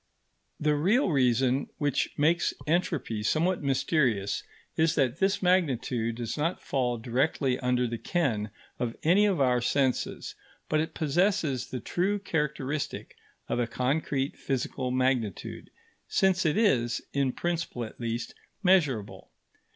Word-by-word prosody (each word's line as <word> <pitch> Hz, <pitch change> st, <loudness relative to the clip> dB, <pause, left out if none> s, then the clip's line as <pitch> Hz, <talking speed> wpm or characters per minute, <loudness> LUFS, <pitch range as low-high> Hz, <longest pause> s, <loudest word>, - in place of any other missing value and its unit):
The 150 Hz, 0 st, +2 dB
real 195 Hz, -, +2 dB
reason 130 Hz, -1 st, +2 dB
which 145 Hz, -4 st, 0 dB
makes 160 Hz, +4 st, +2 dB
entropy 150 Hz, -9 st, 0 dB
somewhat 170 Hz, +11 st, +1 dB
mysterious 130 Hz, -, +1 dB, 0.3 s
is 160 Hz, 0 st, +2 dB
that 135 Hz, 0 st, +1 dB
this 195 Hz, 0 st, +1 dB
magnitude 130 Hz, -10 st, +1 dB
does 120 Hz, +2 st, -4 dB
not 165 Hz, +4 st, 0 dB
fall 125 Hz, -3 st, -1 dB
directly 130 Hz, +2 st, 0 dB
under 125 Hz, -1 st, +1 dB
the 115 Hz, -1 st, -3 dB
ken 120 Hz, -, 0 dB, 0.3 s
of 115 Hz, -2 st, -2 dB
any 195 Hz, +6 st, +5 dB
of 190 Hz, -6 st, +1 dB
our 125 Hz, -2 st, +3 dB
senses; 130 Hz, +1 st, 0 dB, 0.3 s
but 155 Hz, -, +1 dB
it 160 Hz, -, -2 dB
possesses 160 Hz, -, +1 dB
the 130 Hz, -, -4 dB
true 190 Hz, -, 0 dB
characteristic 150 Hz, -6 st, -3 dB, 0.3 s
of -, -, -1 dB
a 120 Hz, -, +1 dB
concrete 135 Hz, +2 st, -1 dB
physical 130 Hz, -1 st, -2 dB
magnitude, 125 Hz, -5 st, -1 dB, 0.4 s
since 185 Hz, -2 st, +2 dB
it 155 Hz, -, +1 dB
is, 120 Hz, -, +2 dB
in 140 Hz, -2 st, +1 dB
principle 170 Hz, -6 st, -3 dB
at 110 Hz, -, -9 dB
least, 115 Hz, 0 st, -3 dB, 0.3 s
measurable. 150 Hz, -, +1 dB
140 Hz, 130 wpm, -28 LUFS, 125-165 Hz, 0.4 s, any